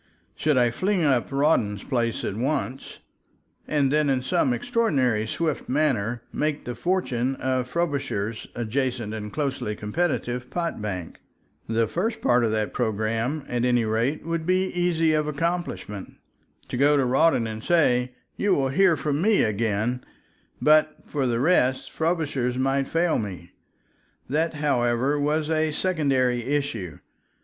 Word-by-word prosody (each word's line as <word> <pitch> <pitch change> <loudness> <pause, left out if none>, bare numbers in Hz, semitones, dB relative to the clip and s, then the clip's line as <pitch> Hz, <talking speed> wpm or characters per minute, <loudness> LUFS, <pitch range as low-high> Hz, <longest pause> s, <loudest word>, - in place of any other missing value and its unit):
Should 150 -3 +1
I 120 -1 +4
fling 185 - 0
up 135 -4 +2
Rawdon's 135 -8 +1
place 120 -4 -1
at 100 - -3
once 135 +2 -2 0.7
and 145 -3 +2
then 150 -1 +3
in 130 -2 +1
some 130 0 +1
extraordinary, 125 - +1
swift 155 +5 -2
manner 125 -5 0
make 150 -1 -1
the 125 - -3
fortune 130 -3 -1
of 130 -1 -1
Frobisher's 140 -9 -2
adjacent 120 -1 -2
and 105 -1 -5
closely 135 -7 -2
competitive 125 +1 -2
pot 170 -9 -3
bank? 95 -5 -5 0.5
The 115 0 +2
first 185 - -2
part 120 0 +3
of 115 - +2
that 110 -1 -1
program, 115 +5 -1
at 120 -1 -1
any 120 -2 +2
rate, 115 +8 -1
would 165 0 -2
be 185 +1 +2
easy 170 -3 +1
of 150 -1 +1
accomplishment, 150 - -3 0.5
to - - -3
go 145 +2 +4
to 135 - +2
Rawdon 130 0 +3
and 110 0 -5
say, 125 -7 +2 0.2
"You 200 -2 +2
will 135 -1 +1
hear 175 +3 +4
from 145 +1 -1
me 210 +2 +4
again," 110 +3 -1 0.6
but 155 0 +4
for 140 -3 -1
the 115 -1 0
rest, 130 -3 +2
Frobisher 155 -6 0
might 135 +1 +1
fail 165 0 +1
me. 90 -5 -6 0.8
That, 160 +4 0
however, 135 -1 +1
was 150 +2 0
a 155 0 +1
secondary 135 -8 +1
issue. 125 - -2
135 Hz, 145 wpm, -25 LUFS, 115-155 Hz, 0.8 s, I